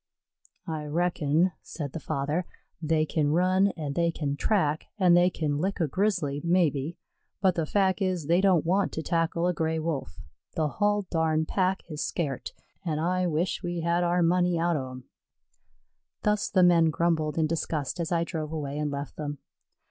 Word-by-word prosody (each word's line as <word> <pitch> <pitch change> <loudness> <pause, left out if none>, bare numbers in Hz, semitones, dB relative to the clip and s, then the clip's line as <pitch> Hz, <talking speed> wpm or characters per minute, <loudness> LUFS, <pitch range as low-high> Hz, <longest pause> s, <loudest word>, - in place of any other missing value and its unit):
"I 160 -4 -4
reckon," 165 +1 +1
said 145 -5 -6
the 165 - -4
father, 155 +4 -2 0.3
"they 155 -1 +2
kin 150 -1 0
run, 185 +3 +3
an' 150 -3 -3
they 170 +2 +2
kin 145 -4 -2
track, 155 -3 0
an' 185 -3 +5
they 175 +1 +5
kin 150 -4 -2
lick 190 +4 -1
a 165 - +2
Grizzly, 170 -5 0
maybe, 170 -3 +1 0.4
but 190 -2 +3
the 165 -2 -2
fac' 190 0 +1
is 185 -5 0
they 170 +4 +3
don't 185 -5 +3
want 190 +4 +2
to 160 - -3
tackle 165 +1 0
a 180 - +2
Gray 160 -1 -1
wolf. 155 - -3 0.4
The 155 -2 +1
hull 205 +4 +1
darn 160 -1 +1
pack 190 +2 0
is 150 -3 -5
scairt 140 -7 -3 0.3
an' 160 -4 -1
I 180 +3 +1
wish 170 +2 -1
we 175 -2 -3
had 170 +1 +1
our 175 0 +2
money 175 0 +2
out 170 0 +1
o' 130 -3 -3
them." 130 0 -9 1.2
Thus 210 0 +1
the 185 -2 +4
men 170 -2 +6
grumbled 160 -1 0
and 160 -1 +2
discussed 160 -1 -2
as 170 +1 -2
I 170 -1 +2
drove 160 -3 -4
away 145 -2 -4
and 150 -1 -1
left 140 0 -5
them. 145 -1 -4
165 Hz, 180 wpm, -27 LUFS, 150-180 Hz, 1.2 s, men